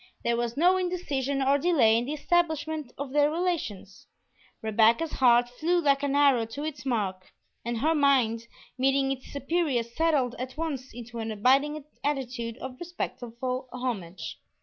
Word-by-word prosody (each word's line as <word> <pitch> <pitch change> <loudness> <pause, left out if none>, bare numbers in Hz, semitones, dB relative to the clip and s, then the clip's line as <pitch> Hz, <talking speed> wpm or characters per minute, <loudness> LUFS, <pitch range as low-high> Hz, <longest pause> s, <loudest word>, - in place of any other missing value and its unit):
There 235 - +1
was 235 +1 -2
no 360 +4 +5
indecision 280 -7 -1
or 275 +2 +3
delay 275 -9 +4
in 235 +1 +1
the 285 - -3
establishment 315 -3 0
of 275 -1 -5
their 295 +1 +4
relations; 310 - -3 0.6
Rebecca's 225 +8 +3
heart 245 -2 +4
flew 320 +9 0
like 280 -4 +2
an 285 -1 0
arrow 275 -6 +4
to 280 +6 -6
its 275 -4 -5
mark, 195 -6 -2 0.3
and 235 0 -2
her 315 +2 +3
mind, 255 -6 +2 0.3
meeting 270 +1 +2
its 265 -1 -6
superior, 285 -3 0
settled 265 0 0
at 255 +2 -6
once 290 -6 -4
into 235 0 -8
an 225 0 -3
abiding 275 +7 +2 0.2
attitude 250 -5 -2
of 260 -1 -7
respectful 255 -7 -4
homage. 195 -9 -5
265 Hz, 150 wpm, -27 LUFS, 235-300 Hz, 0.6 s, no